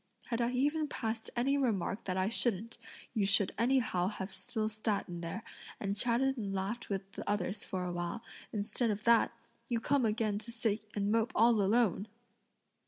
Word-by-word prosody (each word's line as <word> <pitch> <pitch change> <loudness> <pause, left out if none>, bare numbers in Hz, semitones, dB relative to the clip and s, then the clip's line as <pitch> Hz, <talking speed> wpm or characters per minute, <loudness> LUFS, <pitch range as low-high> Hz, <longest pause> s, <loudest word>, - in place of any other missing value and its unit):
Had 235 -1 0
I 235 - +2
even 295 +4 +1
passed 225 -4 -3
any 275 +4 +2
remark 215 -5 0
that 185 -1 -1
I 185 0 +2
shouldn't, 230 0 +1 0.3
you 205 -3 +2
should 200 -1 +4
anyhow 230 -7 +2
have 195 -1 -4
still 215 +4 -2
sat 215 -1 -1
in 175 -1 -6
there, 175 +6 -5 0.4
and 200 0 -1
chatted 245 +5 +2
and 200 -3 -3
laughed 195 +5 -3
with 195 -1 -3
the - - -6
others 205 +1 -1
for 185 -1 -3
a 180 - -2
while; 175 +5 -3 0.3
instead 215 +3 -1
of 210 0 -2
that, 235 0 +5 0.4
you 235 -2 +1
come 275 +3 +2
again 215 -2 +1
to 235 +2 -6
sit 220 -2 -1
and 205 0 +1
mope 225 +2 +2
all 230 -1 +5
alone!" 205 -1 +2
215 Hz, 180 wpm, -33 LUFS, 195-235 Hz, 0.4 s, that